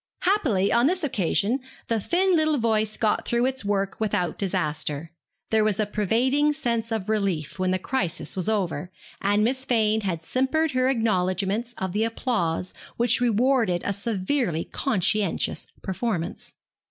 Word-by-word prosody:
Happily 285 Hz, -, +2 dB
on 235 Hz, +3 st, +4 dB
this 360 Hz, +2 st, 0 dB
occasion 220 Hz, -, +1 dB, 0.3 s
the 230 Hz, -1 st, +1 dB
thin 365 Hz, -, +2 dB
little 310 Hz, -2 st, +2 dB
voice 220 Hz, -2 st, +1 dB
got 215 Hz, -2 st, +1 dB
through 240 Hz, +1 st, +1 dB
its 260 Hz, -1 st, -1 dB
work 200 Hz, -1 st, -1 dB
without 180 Hz, -6 st, 0 dB
disaster; 150 Hz, -4 st, -1 dB, 0.4 s
there 220 Hz, -1 st, +4 dB
was 215 Hz, -2 st, +1 dB
a 215 Hz, -, +3 dB
pervading 250 Hz, +9 st, +1 dB
sense 235 Hz, -6 st, -1 dB
of 215 Hz, -3 st, -2 dB
relief 195 Hz, -7 st, -1 dB
when 185 Hz, 0 st, +1 dB
the 185 Hz, -, +2 dB
crisis 185 Hz, -, -2 dB
was 190 Hz, +2 st, 0 dB
over, 180 Hz, -5 st, -1 dB, 0.3 s
and 205 Hz, +1 st, +2 dB
Miss 260 Hz, +3 st, +1 dB
Fane 220 Hz, -4 st, +2 dB
had 175 Hz, -5 st, -3 dB
simpered 275 Hz, -, +1 dB
her 255 Hz, 0 st, +2 dB
acknowledgments 210 Hz, 0 st, 0 dB
of 190 Hz, -1 st, -3 dB
the 215 Hz, +2 st, +1 dB
applause 220 Hz, -7 st, -1 dB, 0.2 s
which 240 Hz, +1 st, +2 dB
rewarded 235 Hz, -5 st, +2 dB
a 200 Hz, -, 0 dB
severely 200 Hz, -, -1 dB
conscientious 210 Hz, -, 0 dB, 0.2 s
performance. 190 Hz, -3 st, -3 dB
215 Hz, 150 wpm, -25 LUFS, 185-250 Hz, 0.4 s, on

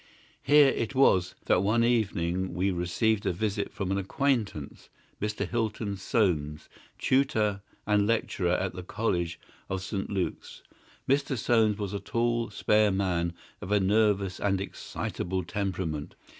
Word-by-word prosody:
Here 145 Hz, -1 st, +6 dB
it 115 Hz, +2 st, -2 dB
was 95 Hz, -9 st, +4 dB
that -, -, +3 dB
one 110 Hz, +4 st, +2 dB
evening 95 Hz, -7 st, 0 dB
we 95 Hz, +2 st, +1 dB
received 95 Hz, +5 st, 0 dB
a -, -, +3 dB
visit 105 Hz, +3 st, -2 dB
from 95 Hz, -1 st, -3 dB
an 100 Hz, -, +1 dB
acquaintance, 105 Hz, -, -2 dB, 0.3 s
Mr. 105 Hz, +1 st, -2 dB
Hilton 110 Hz, -3 st, -2 dB
Soames, 85 Hz, -8 st, 0 dB, 0.3 s
tutor 110 Hz, -7 st, +1 dB, 0.2 s
and 105 Hz, -1 st, +2 dB
lecturer 95 Hz, -5 st, 0 dB
at 95 Hz, 0 st, -1 dB
the 90 Hz, -, -6 dB
College 85 Hz, -3 st, -2 dB, 0.3 s
of 95 Hz, -1 st, -3 dB
St. 95 Hz, 0 st, -3 dB
Luke's. 95 Hz, -3 st, -4 dB, 0.4 s
Mr. 140 Hz, 0 st, +1 dB
Soames 110 Hz, -2 st, +2 dB
was 100 Hz, -2 st, -4 dB
a 100 Hz, -, -2 dB
tall, 115 Hz, +3 st, 0 dB
spare 105 Hz, 0 st, +3 dB
man, 90 Hz, -3 st, 0 dB, 0.3 s
of 95 Hz, -, -6 dB
a 105 Hz, -, +4 dB
nervous 100 Hz, -1 st, +2 dB
and 100 Hz, -2 st, +1 dB
excitable 95 Hz, -1 st, -4 dB
temperament. 85 Hz, -5 st, -3 dB
100 Hz, 140 wpm, -28 LUFS, 90-110 Hz, 0.4 s, Here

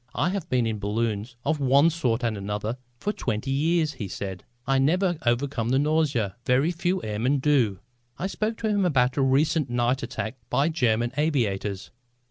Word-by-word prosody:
"I 145 Hz, +8 st, +1 dB
have 185 Hz, -3 st, -4 dB
been 125 Hz, -2 st, +2 dB
in 110 Hz, -2 st, -2 dB
balloons 110 Hz, +2 st, -2 dB
of 155 Hz, +1 st, +1 dB
one 140 Hz, +4 st, +4 dB
sort 125 Hz, -7 st, -1 dB
and 115 Hz, -2 st, 0 dB
another 105 Hz, +4 st, -3 dB, 0.2 s
for 205 Hz, +11 st, -2 dB
twenty 115 Hz, -, -2 dB
years," 155 Hz, +2 st, +1 dB
he 105 Hz, -, -5 dB
said. 95 Hz, -1 st, -6 dB, 0.2 s
"I 135 Hz, +1 st, +2 dB
never 175 Hz, +4 st, +2 dB
overcome 120 Hz, -1 st, 0 dB
the 130 Hz, -, +3 dB
nausea. 145 Hz, -9 st, +1 dB
Very 135 Hz, +8 st, +2 dB
few 180 Hz, +1 st, -1 dB
airmen 110 Hz, +7 st, 0 dB
do." 130 Hz, -8 st, +2 dB, 0.4 s
I -, -, -3 dB
spoke 215 Hz, +3 st, -2 dB
to 225 Hz, -, 0 dB
him 205 Hz, -2 st, +2 dB
about 130 Hz, -7 st, +2 dB
a -, -, +3 dB
recent 135 Hz, +2 st, +2 dB
night 120 Hz, +2 st, +1 dB
attack 120 Hz, 0 st, -4 dB
by 145 Hz, +4 st, +2 dB
German 120 Hz, -6 st, +1 dB
aviators. 105 Hz, -10 st, -1 dB
130 Hz, 175 wpm, -25 LUFS, 115-155 Hz, 0.4 s, one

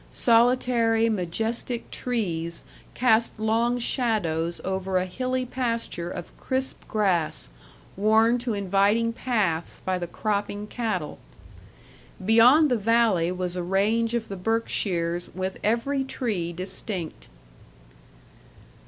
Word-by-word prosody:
Solitary, 230 Hz, -1 st, +3 dB
majestic 225 Hz, +5 st, -3 dB
trees 170 Hz, -9 st, -3 dB, 0.3 s
cast 230 Hz, -2 st, +2 dB
long 230 Hz, +3 st, +1 dB
shadows 200 Hz, -, -1 dB
over 190 Hz, 0 st, -1 dB
a 185 Hz, -, +1 dB
hilly 255 Hz, +6 st, -2 dB
pasture 230 Hz, -8 st, -3 dB
of 175 Hz, -1 st, -8 dB
crisp 260 Hz, 0 st, -2 dB
grass 185 Hz, -, 0 dB, 0.5 s
worn 220 Hz, +4 st, +3 dB
to 240 Hz, -2 st, -2 dB
inviting 200 Hz, +4 st, +2 dB
paths 205 Hz, -10 st, -1 dB
by 185 Hz, -1 st, -2 dB
the 175 Hz, -, -4 dB
cropping 205 Hz, +1 st, -2 dB
cattle. 210 Hz, -8 st, -3 dB, 1.1 s
Beyond 250 Hz, +8 st, +6 dB
the 245 Hz, -, +3 dB
valley 210 Hz, -6 st, +3 dB
was 180 Hz, -1 st, -3 dB
a 180 Hz, -, -2 dB
range 215 Hz, +6 st, +1 dB
of 230 Hz, -2 st, -2 dB
the 195 Hz, -, -5 dB
Berkshires 180 Hz, -4 st, -1 dB
with 185 Hz, +1 st, -3 dB
every 250 Hz, +5 st, +1 dB
tree 210 Hz, -10 st, -3 dB
distinct. 185 Hz, 0 st, -4 dB
215 Hz, 110 wpm, -25 LUFS, 185-235 Hz, 1.1 s, Beyond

